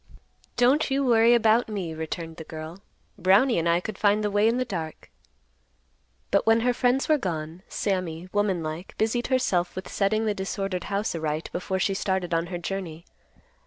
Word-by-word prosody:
"Don't 260 +5 +3
you 275 +1 +1
worry 235 -1 +5
about 225 0 +3
me," 190 -6 -3
returned 160 +1 -5
the 160 - -7
girl, 160 +4 -8 0.4
"Brownie 195 +6 +4
and 170 +1 0
I 170 +1 +3
could 210 +2 -7
find 210 0 +3
the 210 - 0
way 205 +2 +3
in 230 +2 +2
the 255 - 0
dark." 165 -8 -6 1.2
But - - +2
when 225 0 +5
her 245 +1 +2
friends 250 +2 +1
were 310 -1 +3
gone, 165 -4 -4
Sammy, 185 -4 -2
womanlike, 180 -5 -2
busied 225 +2 0
herself 200 -10 +1
with 185 - -6
setting 215 +2 0
the 215 - +1
disordered 195 -2 -3
house 200 +1 -1
aright 155 -1 -3
before 190 +1 -2
she 195 +1 +1
started 190 -2 -1
on 165 +1 +1
her 175 - -4
journey. 170 -2 -5
195 Hz, 175 wpm, -26 LUFS, 170-225 Hz, 1.2 s, worry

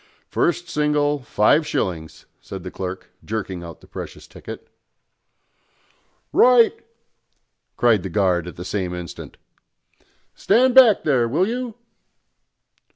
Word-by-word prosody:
"First 175 0 0
single, 150 -1 0
five 125 +7 +2
shillings," 80 -4 -3
said 95 -2 -9
the 90 - -7
clerk, 95 0 -6
jerking 95 -5 -4
out 85 -2 -10
the - - -18
precious - - -9
ticket. - - -10 1.7
"Right!" 245 -2 +6 1.0
cried 115 -5 +3
the 95 - -5
guard 90 -2 +1
at 90 - -8
the 90 - -8
same 90 -3 -3
instant. 90 -2 -9 1.0
"Stand 245 +5 +3
back 245 -6 +7
there, 130 -6 +2
will 165 +11 +1
you!" 240 -1 -4
115 Hz, 115 wpm, -21 LUFS, -, 1.7 s, back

